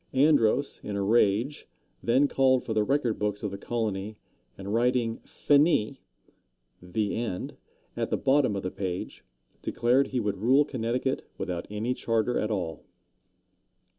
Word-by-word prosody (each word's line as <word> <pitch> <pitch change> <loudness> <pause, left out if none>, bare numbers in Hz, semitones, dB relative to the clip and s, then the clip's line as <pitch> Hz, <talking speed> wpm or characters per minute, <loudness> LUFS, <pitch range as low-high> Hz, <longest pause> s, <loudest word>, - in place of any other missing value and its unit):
Andros, 140 -2 +3
in 105 - -4
a 100 - -1
rage, 115 +5 +2 0.3
then 130 +5 +3
called 130 -2 +3
for 110 - -3
the 110 -1 +2
record 130 -2 0
books 105 0 -2
of 105 - -2
the 100 - -5
colony, 110 -2 -3 0.4
and 100 +1 -5
writing 120 -1 +1
Finis 140 -4 +2 0.8
("The 100 +4 -2
End") 110 -6 -4 0.4
at - - -2
the - - 0
bottom 135 -5 +2
of 100 - -3
the 95 - -3
page, 95 -3 -5 0.4
declared 125 +4 +2
he 130 - -2
would 105 -3 -2
rule 130 +8 +4
Connecticut 125 0 -2
without 90 -2 -4
any 110 +4 -2
charter 115 0 0
at 110 - -1
all. 90 -7 -3
115 Hz, 145 wpm, -27 LUFS, 105-130 Hz, 0.8 s, rule